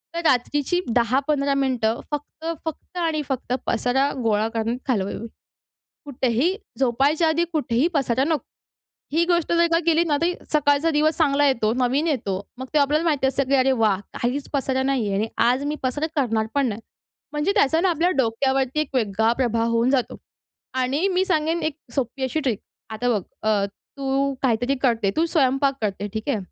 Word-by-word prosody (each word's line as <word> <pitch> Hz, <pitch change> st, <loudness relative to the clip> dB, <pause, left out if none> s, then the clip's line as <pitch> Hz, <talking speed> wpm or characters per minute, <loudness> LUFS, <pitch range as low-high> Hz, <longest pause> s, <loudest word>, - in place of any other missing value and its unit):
तर -, -, -1 dB
रात्रीची 290 Hz, +5 st, +2 dB, 0.2 s
10-15 275 Hz, +4 st, +2 dB
मिनिटं 250 Hz, -5 st, 0 dB
फक्त, 295 Hz, +2 st, -6 dB, 0.2 s
फक्त 320 Hz, +3 st, -7 dB
आणि 325 Hz, -3 st, 0 dB
फक्त 255 Hz, -2 st, -2 dB
पसारा 250 Hz, +4 st, +1 dB
गोळा 215 Hz, -1 st, +2 dB
करण्यात 230 Hz, +1 st, -1 dB
घालवावी. 210 Hz, -3 st, -1 dB, 0.8 s
कुठेही 270 Hz, -, 0 dB, 0.2 s
झोपायच्या 275 Hz, +6 st, +2 dB
आधी 325 Hz, +2 st, +2 dB
कुठेही 255 Hz, -3 st, +1 dB
पसारा 265 Hz, -3 st, +1 dB
नको. 305 Hz, -4 st, 0 dB, 0.7 s
ही 330 Hz, +3 st, +3 dB
गोष्ट 345 Hz, -2 st, +1 dB
जर 340 Hz, 0 st, +4 dB
का 330 Hz, -, +5 dB
केली 330 Hz, 0 st, +4 dB
ना, 300 Hz, -3 st, +1 dB
तरी 345 Hz, +2 st, +1 dB, 0.2 s
सकाळचा 295 Hz, +1 st, +3 dB
दिवस 310 Hz, +1 st, +2 dB
चांगला 290 Hz, -3 st, +3 dB
येतो, 230 Hz, -5 st, +2 dB
नवीन 260 Hz, +5 st, +1 dB
येतो. 210 Hz, -, -1 dB, 0.2 s
मग 260 Hz, -, -5 dB
ते -, -, +5 dB
आपल्याला 295 Hz, +3 st, +2 dB
माहिती 295 Hz, -5 st, +1 dB
असतं 275 Hz, +1 st, +1 dB
की 275 Hz, -, +2 dB
अरे 265 Hz, 0 st, +4 dB
वाह! 205 Hz, -4 st, +3 dB
काहीच 260 Hz, +4 st, -2 dB
पसारा 265 Hz, -2 st, 0 dB
नाही 265 Hz, -4 st, 0 dB
आहे 200 Hz, -, -1 dB
आणि 210 Hz, +3 st, 0 dB, 0.2 s
आज 255 Hz, +3 st, +2 dB
मी 295 Hz, +1 st, -1 dB
पसारा 280 Hz, +4 st, -1 dB
करणार 225 Hz, -6 st, +1 dB
पण 280 Hz, -1 st, +2 dB
नाही. 215 Hz, 0 st, -4 dB, 0.5 s
म्हणजे 295 Hz, +6 st, 0 dB
त्याचा 320 Hz, +4 st, +3 dB
ना 370 Hz, +1 st, +3 dB
आपल्या 340 Hz, +2 st, +1 dB
डोक्यावरती 265 Hz, +3 st, +1 dB
एक 290 Hz, -3 st, -4 dB
वेगळा 220 Hz, -1 st, +2 dB
प्रभाव 230 Hz, -2 st, +1 dB
होऊन 230 Hz, +2 st, +2 dB
जातो 260 Hz, -3 st, 0 dB, 0.7 s
आणि 280 Hz, +8 st, 0 dB
मी 375 Hz, 0 st, +1 dB
सांगेन 325 Hz, -2 st, 0 dB
एक 310 Hz, -1 st, -2 dB, 0.2 s
सोपी 265 Hz, 0 st, -2 dB
अशी 260 Hz, +5 st, -1 dB
ट्रिक. 250 Hz, -8 st, -1 dB, 0.3 s
आता 220 Hz, +3 st, -2 dB
बघ 210 Hz, -5 st, +1 dB, 0.3 s
अ, 205 Hz, -2 st, +2 dB, 0.3 s
तू 275 Hz, 0 st, 0 dB
काहीतरी 245 Hz, +1 st, +1 dB
करते, 230 Hz, -6 st, +2 dB
तू 330 Hz, -, +3 dB
स्वयंपाक 275 Hz, -3 st, +2 dB
करते 205 Hz, -1 st, -2 dB
ठीक 220 Hz, +4 st, -5 dB
आहे 275 Hz, -, +1 dB
270 Hz, 175 wpm, -23 LUFS, 235-305 Hz, 0.8 s, का